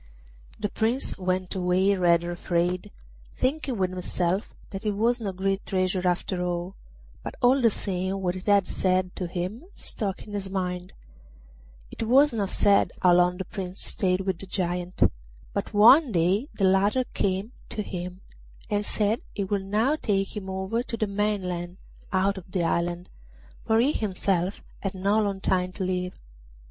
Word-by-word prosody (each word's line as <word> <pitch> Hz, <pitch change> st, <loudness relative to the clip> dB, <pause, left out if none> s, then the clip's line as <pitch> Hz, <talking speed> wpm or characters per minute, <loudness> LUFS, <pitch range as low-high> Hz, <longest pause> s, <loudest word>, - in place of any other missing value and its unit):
The 210 Hz, -1 st, -1 dB
Prince 230 Hz, +4 st, 0 dB
went 185 Hz, 0 st, -1 dB
away 185 Hz, +1 st, +2 dB
rather 175 Hz, -2 st, +3 dB
afraid, 175 Hz, +1 st, -1 dB, 0.5 s
thinking 270 Hz, -2 st, 0 dB
with 185 Hz, -1 st, 0 dB
himself 185 Hz, +1 st, -2 dB, 0.2 s
that 195 Hz, +1 st, -6 dB
it 210 Hz, -1 st, 0 dB
was 235 Hz, +4 st, +1 dB
no 200 Hz, -3 st, -2 dB
great 195 Hz, +1 st, -1 dB
treasure 185 Hz, -1 st, 0 dB
after 180 Hz, +1 st, 0 dB
all; 175 Hz, +2 st, -3 dB, 0.5 s
but -, -, -6 dB
all 260 Hz, +1 st, +4 dB
the 230 Hz, -, +6 dB
same 190 Hz, -1 st, -2 dB
what 180 Hz, -1 st, -1 dB
it 185 Hz, -, -7 dB
had 200 Hz, -2 st, +5 dB
said 185 Hz, 0 st, 0 dB
to 180 Hz, -, -2 dB
him 180 Hz, -, -4 dB
stuck 195 Hz, -4 st, 0 dB
in 210 Hz, -, -11 dB
his 195 Hz, -2 st, -3 dB
mind. 180 Hz, -1 st, -3 dB, 1.0 s
It -, -, -8 dB
is 260 Hz, +5 st, +5 dB
not 205 Hz, -4 st, -1 dB
said 200 Hz, -1 st, +3 dB
how 180 Hz, -1 st, +5 dB
long 180 Hz, 0 st, +4 dB
the 190 Hz, -, -4 dB
Prince 190 Hz, -2 st, -6 dB
stayed 185 Hz, 0 st, 0 dB
with 190 Hz, -3 st, -2 dB
the 195 Hz, -, -8 dB
Giant, 180 Hz, -1 st, -1 dB, 0.5 s
but -, -, -2 dB
one 240 Hz, +7 st, +7 dB
day 190 Hz, -, +2 dB
the 195 Hz, -, +2 dB
latter 200 Hz, +6 st, +3 dB
came 195 Hz, +3 st, -1 dB, 0.2 s
to 210 Hz, -, -3 dB
him 180 Hz, 0 st, -6 dB, 0.5 s
and 205 Hz, 0 st, +1 dB
said 210 Hz, +2 st, 0 dB
he 200 Hz, -, -1 dB
would 195 Hz, 0 st, -1 dB
now 220 Hz, +9 st, +2 dB
take 195 Hz, -9 st, -1 dB
him 195 Hz, -2 st, -5 dB
over 190 Hz, +5 st, -1 dB
to 240 Hz, -2 st, -5 dB
the 215 Hz, -, +1 dB
mainland 190 Hz, -4 st, -2 dB, 0.3 s
out 195 Hz, +1 st, +1 dB
of 180 Hz, 0 st, -17 dB
the 180 Hz, -2 st, 0 dB
island, 175 Hz, +1 st, -1 dB, 0.6 s
for 220 Hz, 0 st, +4 dB
he 260 Hz, +5 st, +4 dB
himself 195 Hz, -, -1 dB, 0.2 s
had 195 Hz, -1 st, -3 dB
no 200 Hz, +3 st, +2 dB
long 200 Hz, -2 st, -1 dB
time 185 Hz, -1 st, +1 dB
to 190 Hz, -, -4 dB
live. 180 Hz, 0 st, -2 dB
190 Hz, 170 wpm, -26 LUFS, 180-210 Hz, 1.0 s, one